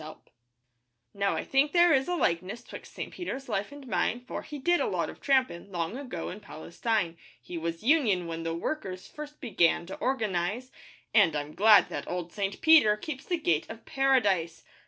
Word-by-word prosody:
SAINT 155 0 -9
PETER - - -32 0.8
Now, 200 0 0
I - - -2
think 275 +2 +2
there 345 -1 +6
is 265 -1 +2
a 355 - 0
likeness 185 - -1
'Twixt - - -11
St. - - -7
Peter's 275 -6 -5
life 205 -1 -2
and 285 -1 -11
mine, 240 0 0
For - - -5
he 300 - -8
did 345 +6 +2
a - - +1
lot - - -1
of - - -17
trampin' 255 -9 +1
Long 170 +3 -3
ago 270 -1 -5
in 195 - -7
Palestine. 175 +1 -3 0.2
He 125 +9 -9
was 165 +1 -4
'union' 230 - +3
when 165 0 -5
the 165 0 -3
workers 185 - -4
First 300 0 -10
began 175 - +2
to 190 - -8
organise, 220 -1 -1 0.4
And 200 -8 +5
I'm 150 +1 -4
glad 210 0 +6
that - - -5
old 175 -1 -4
St. 200 -1 -3
Peter 300 -10 +6
Keeps 270 +3 -6
the 350 - -1
gate 165 - 0
of 225 0 -10
Paradise. 205 -12 +1
210 Hz, 195 wpm, -28 LUFS, 170-270 Hz, 0.8 s, there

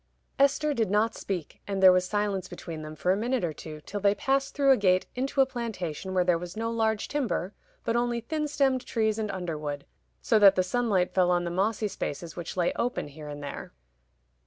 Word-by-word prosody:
Esther 280 +2 +3
did 225 -7 0
not 210 +2 +2
speak, 180 -6 -5
and 195 -1 -2
there 185 - +10
was 180 0 +2
silence 205 -3 -1
between 165 -4 -7
them 155 0 -8
for 180 +4 +1
a - - +3
minute 240 +3 -1
or 165 -3 -1
two, 155 +1 -9
till 205 +6 -5
they 200 0 +3
passed 270 +5 0
through 275 -1 +4
a - - +8
gate 185 -4 +3
into 270 +2 0
a - - +6
plantation 190 - -4
where 180 - +4
there 175 -2 +2
was 180 +3 -8
no 230 +1 -1
large 220 -2 0
timber, 235 - -2 0.3
but 230 - 0
only 240 0 +1
thin 300 +6 -2
stemmed 270 -3 +1
trees 220 -1 0
and 215 -1 -2
underwood, 155 -7 -4 0.3
so 65 - +3
that 200 -2 +8
the 185 - +3
sunlight 195 -2 +1
fell 180 -2 +3
on 175 -1 +2
the 170 - -3
mossy 210 +4 0
spaces 170 -4 -5
which 175 +1 -6
lay 175 -1 +2
open 240 -10 -1
here 150 +1 -10
and 145 0 -7
there. 140 - -7
200 Hz, 215 wpm, -28 LUFS, 175-235 Hz, 0.3 s, there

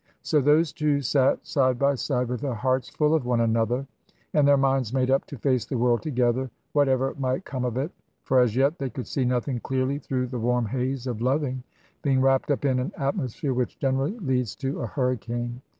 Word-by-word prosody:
So 150 -2 +2
those 150 +3 +3
two 150 -3 +1
sate 135 0 +2
side 130 -4 +2
by 140 +2 +3
side, 125 -2 -1
with 125 0 -3
their 135 -4 -2
hearts 130 +3 0
full 150 0 +1
of 160 -4 +2
one 120 -2 +2
another, 115 +3 +1 0.5
and 145 -2 +4
their 140 0 +6
minds 135 -4 +1
made 130 0 +1
up 135 - +2
to 145 - -8
face 125 -1 +1
the 130 - -3
world 120 0 +2
together, 130 -3 0 0.2
whatever 135 -2 +2
might 130 +6 -1
come 130 -2 -4
of 125 -1 -2
it. 145 +6 -2 0.3
For 130 - +3
as 120 -3 +3
yet 140 +6 +2
they 135 -2 -2
could 125 +2 -6
see 130 - -1
nothing 125 +1 0
clearly 135 +3 -1
through 130 -2 -2
the 125 -1 -4
warm 120 +1 +1
haze 130 +3 -2
of 120 -4 -3
loving, 130 0 0 0.4
being 135 -2 +2
wrapped 135 +1 +2
up 145 0 0
in 130 -2 +2
an 125 - -2
atmosphere 140 - -2
which 125 0 -2
generally 135 - 0
leads 130 - -1
to 135 0 -3
a 120 - -2
hurricane. 120 0 -2
130 Hz, 210 wpm, -25 LUFS, 125-140 Hz, 0.5 s, their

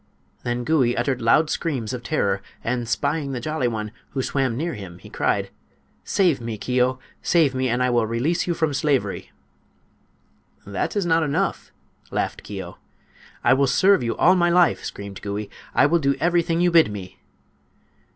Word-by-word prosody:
Then 120 0 -2
Gouie 130 -4 +2
uttered 130 -3 0
loud 150 +7 +3
screams 130 -8 -2
of 125 - -4
terror, 100 -7 0 0.2
and, 120 -1 -2
spying 140 +2 -1
the 125 - -3
Jolly 155 0 -1
One, 110 -2 -3 0.2
who 130 - -1
swam 130 -4 0
near 165 +4 -2
him, 90 -4 -9
he - - -14
cried: - - 0 0.5
"Save 175 -10 +2
me, 115 -2 -4
Keo! 125 +3 +1 0.2
Save 160 -6 +3
me, 130 0 0
and 120 +2 +1
I 125 - +2
will 120 -2 +2
release 130 +12 0
you 175 - 0
from 160 -3 0
slavery!" 140 -2 -1 1.3
"That 100 - -3
is 200 -3 0
not 165 -1 +3
enough," 145 -2 -1 0.4
laughed - - -2
Keo. - - -8 0.6
"I - - +5
will 135 +1 +3
serve 195 +7 +4
you 115 -1 -2
all 180 - +5
my 175 -1 +3
life!" 175 -1 +3
screamed 100 -1 -7
Gouie; 105 0 -4 0.2
"I - - +5
will 170 +4 +3
do 140 -2 +1
everything 170 0 +1
you 175 0 +3
bid 165 -9 +5
me!" 95 -3 -8
130 Hz, 170 wpm, -23 LUFS, 115-160 Hz, 1.3 s, I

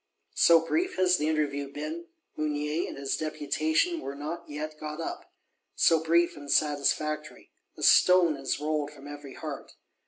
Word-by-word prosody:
So 165 -1 +6
brief 360 - 0
has 180 -1 +3
the 150 - -1
interview 145 -3 -1
been, 320 - -6 0.3
Mounier 150 +1 -1
and - - -8
his 140 -1 -2
Deputation 155 - 0
were 140 - -6
not 165 +4 -6
yet 155 +1 -6
got 150 +1 -6
up. 165 - -6 0.4
So 160 - +4
brief 170 +1 +2
and 145 -1 -10
satisfactory. 150 +1 0 0.3
A - - -7
stone 180 -4 +6
is 135 0 -3
rolled 150 -1 -1
from 145 -1 -13
every 145 -2 -9
heart. 155 -5 -7
155 Hz, 155 wpm, -28 LUFS, 145-165 Hz, 0.4 s, So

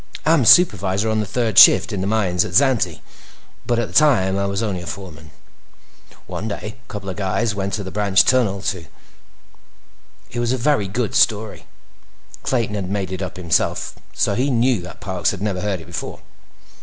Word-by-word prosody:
"I'm 155 -5 +3
supervisor 105 - +4
on 110 - 0
the 105 - -2
third 110 0 +2
shift - - +7
in 95 - -3
the 95 - -2
mines 95 -5 +1
at - - -6
Xanthe, 125 - +2 0.7
but 120 - +1
at 120 -2 -1
the - - -14
time, 115 -11 +3
I 100 0 -1
was 100 +3 -2
only 95 -5 -3
a 85 - -10
foreman. 80 -5 -9 1.0
One 110 - -6
day, 105 0 -6
a - - -16
couple 105 -2 -7
of 95 - -6
guys 105 +3 -1
went 100 -1 -4
to 100 -2 -3
a 95 - -7
branch 100 -3 +3
tunnel 105 -7 +1
to—" 90 -5 -3 1.4
It 120 - -4
was 120 +1 0
a - - -1
very 125 -5 +1
good 110 +2 -3
story. 110 -1 +1 0.7
Clayton 115 -5 -1
had 100 -3 -4
made 100 -2 -3
it 95 0 -5
up 95 -1 -6
himself, 85 -3 -1 0.2
so - - 0
he 130 +7 0
knew 120 -4 +1
that 90 - -11
Parks 95 -3 -1
had 100 - -5
never 95 -3 -2
heard 100 -3 -2
it - - -12
before. 85 +1 -7
100 Hz, 195 wpm, -20 LUFS, 95-115 Hz, 1.4 s, shift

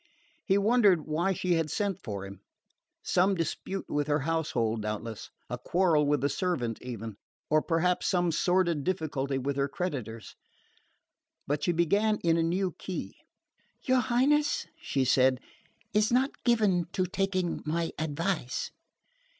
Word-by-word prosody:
He 195 -1 +2
wondered 200 -6 +4
why 165 +5 0
she 180 -1 0
had 165 -2 +1
sent 200 -1 -1
for 100 -3 -5
him. 100 0 -10 0.6
Some 190 +2 +3
dispute 185 +3 -3
with 145 0 -1
her 150 0 +1
household, 130 -8 0
doubtless; 105 +1 -5 0.2
a - - -5
quarrel 165 -5 +2
with 145 -2 +1
a - - +4
servant, 145 - -2
even 115 -4 -6 0.3
or 155 0 +5
perhaps 175 +2 +1
some 175 -2 +2
sordid 170 -2 +2
difficulty 140 -6 -1
with 135 +1 -2
her 140 0 +2
creditors. 125 - -5 1.1
But 145 +1 -1
she - - +2
began 200 +6 +2
in 165 -1 +3
a 165 - +2
new 180 +3 0
key. 185 - -5 0.7
"Your 260 -1 +3
Highness," 275 +5 +2 0.2
she 135 -2 0
said, 130 0 +4 0.5
"is 210 +1 +3
not 260 +3 +3
given 210 -8 +3
to 185 - +1
taking 185 -1 -1
my 165 +2 -1
advice." 160 -2 -2
165 Hz, 140 wpm, -29 LUFS, 140-190 Hz, 1.1 s, or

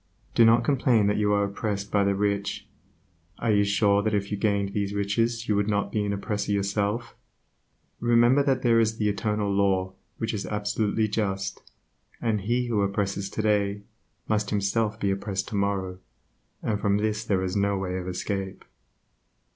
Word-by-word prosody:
Do 115 - +5
not 115 +1 +5
complain 125 -4 +3
that 105 +1 +1
you 105 -1 +2
are 100 0 +3
oppressed 100 0 -3
by 100 -1 +3
the 100 0 +1
rich. 100 0 -1 0.7
Are 115 - 0
you 100 -1 +4
sure 100 0 +3
that 110 0 0
if 100 0 -2
you - - 0
gained 100 -1 0
riches 105 +3 -1
you 105 - +2
would 100 0 +1
not 100 -1 0
be 105 - 0
an 100 - -1
oppressor 105 0 -2
yourself? 100 +3 -1 0.8
Remember 120 +3 +4
that 135 -2 +1
there 115 -2 +4
is 110 0 +1
the 105 -2 +1
Eternal 105 -1 -1
Law 95 -1 +1 0.2
which 115 - -2
is 105 - -3
absolutely 105 +1 0
just, 100 -2 -2 0.6
and 110 -3 0
that 95 - -10
he 120 +3 +1
who 115 -4 0
oppresses 100 0 -1
today 105 -1 0 0.4
must 105 -2 0
himself 105 +2 0
be 100 -2 +1
oppressed 95 0 -3
tomorrow; 100 -3 -2 0.6
and 105 -2 -1
from 100 0 +2
this 110 +1 -1
there 95 -4 0
is 95 +1 -2
no 100 0 +1
way 95 -1 -3
of 90 - -6
escape. 95 +1 -4
100 Hz, 170 wpm, -26 LUFS, 100-110 Hz, 0.8 s, Do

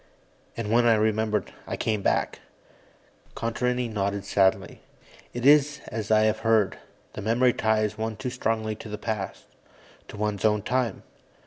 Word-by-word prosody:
And 110 -2 -3
when 120 +1 +4
I 115 - +6
remembered, 110 -2 0
I - - -3
came 110 -2 -1
back." - - 0 1.0
Contarini 125 +2 -1
nodded 100 -2 -2
sadly. 95 -1 +1 0.5
"It 120 +1 -5
is 145 0 +5
as 110 -2 -4
I 110 0 +5
have 110 0 +2
heard. 110 -3 +2 0.3
The - - -6
memory 120 +4 +3
ties 110 -1 0
one 110 0 -2
too 125 +2 -4
strongly 110 -3 -1
to 110 - -9
the 105 - -4
past 105 -3 -4 0.6
to - - -10
one's 105 -1 -2
own 105 -2 +2
time. 125 -4 -1
110 Hz, 150 wpm, -26 LUFS, 105-115 Hz, 1.0 s, I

